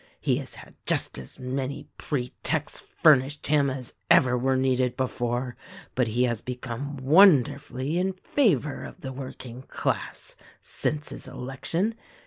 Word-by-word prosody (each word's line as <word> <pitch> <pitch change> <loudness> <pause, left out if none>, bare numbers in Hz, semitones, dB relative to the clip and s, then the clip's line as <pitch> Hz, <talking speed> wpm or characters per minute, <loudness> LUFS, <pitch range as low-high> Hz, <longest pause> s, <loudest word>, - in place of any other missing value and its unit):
He - - +1
has - - -6
had - - -13
just - - 0
as 65 - -9
many 130 +1 -4
pretexts 125 -5 -2
furnished 145 -1 +3
him 145 -2 +3
as 130 -2 -3 0.2
ever 125 -1 +6
were 130 +1 +1
needed 130 -1 +1
before, 125 -1 -1 0.4
but 125 -2 +1
he 120 +3 +1
has 120 -3 0
be 125 - -4
come 135 +4 -5
wonderfully 140 - +4
in 190 +1 0
favor 180 - +1
of - - -9
the 135 -3 -5
working 130 -2 -8
class - - -3 0.2
since 150 0 -3
his - - -7
election. 165 - -1
130 Hz, 140 wpm, -26 LUFS, 125-145 Hz, 0.4 s, ever